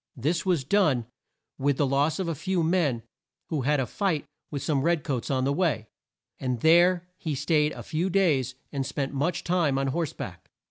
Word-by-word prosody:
This 160 +9 -1
was 175 -7 +2
done, 145 - +2 0.5
with 140 0 +1
the 145 - +3
loss 140 +3 +1
of 190 -3 -2
a 165 - 0
few 175 +3 -1
men 160 -9 +1 0.5
who 155 -4 -1
had 145 +3 +2
a 130 - +1
fight 165 - -1 0.2
with 140 -2 -4
some 145 -4 +1
red 170 +1 +1
coats 130 -6 -2
on 130 -1 +1
the 140 +2 +1
way, 140 - 0 0.5
and 125 -3 -2
there 175 +2 +5
he 155 -5 -3
staid 150 +1 +2
a - - -8
few 170 +4 -1
days, 150 -10 +2 0.2
and 140 -2 -1
spent 135 +1 -3
much 160 +6 -1
time 170 -6 +1
on 135 0 0
horse 160 +1 -1
back. - - -8
150 Hz, 195 wpm, -27 LUFS, 135-170 Hz, 0.5 s, there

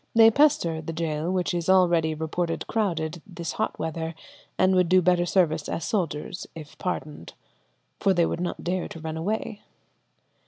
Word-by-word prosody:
They 225 0 +8
pester 220 - +3
the 165 +1 -5
gaol, 160 0 -2
which 185 -1 0
is 175 0 -2
already 170 -4 +4
reported 165 +2 -2
crowded, 170 -7 -1
this 170 -3 -5
hot - - -2
weather, 160 +1 -4 0.4
and 185 0 +4
would 180 -2 +3
do 185 0 +6
better 175 0 +2
service 165 -5 +1
as 165 - -3
soldiers 175 -3 -2
if 155 -2 -10
pardoned, 155 - -4 0.7
'for 195 - +3
they 175 -3 +3
would 170 - -2
not 180 - -3
dare 180 +1 -1
to 165 - -9
run 160 0 -5
away.'" 205 +5 -3
170 Hz, 165 wpm, -26 LUFS, 160-185 Hz, 0.7 s, They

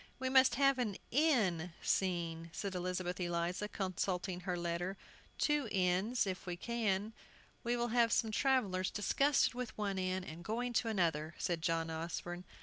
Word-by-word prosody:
"We 260 0 -1
must 260 0 +6
have 275 0 +4
an 215 -6 -1
'inn' 210 - +2
scene," 170 -3 0
said 200 -2 -3
Elizabeth 180 0 -2
Eliza, 175 +3 -1
consulting 185 -2 -2
her 180 -1 -2
letter; 175 +2 -2 0.4
"two 295 -6 +1
inns, 190 +6 +2
if 190 0 -4
we 175 -1 -3
can." 215 -1 -1 0.5
"We 240 0 0
will 240 0 0
have 235 0 +3
some 220 -2 +2
travellers 215 -8 +2
disgusted 275 +8 +2
with 250 -1 -5
one 200 -2 -1
inn, 185 0 -1
and 170 0 -8
going 240 +4 -2
to 230 - +1
another," 165 -7 0
said 170 -2 -1
John 165 -1 0
Osborne. 175 +2 -4
190 Hz, 155 wpm, -35 LUFS, 175-235 Hz, 0.5 s, must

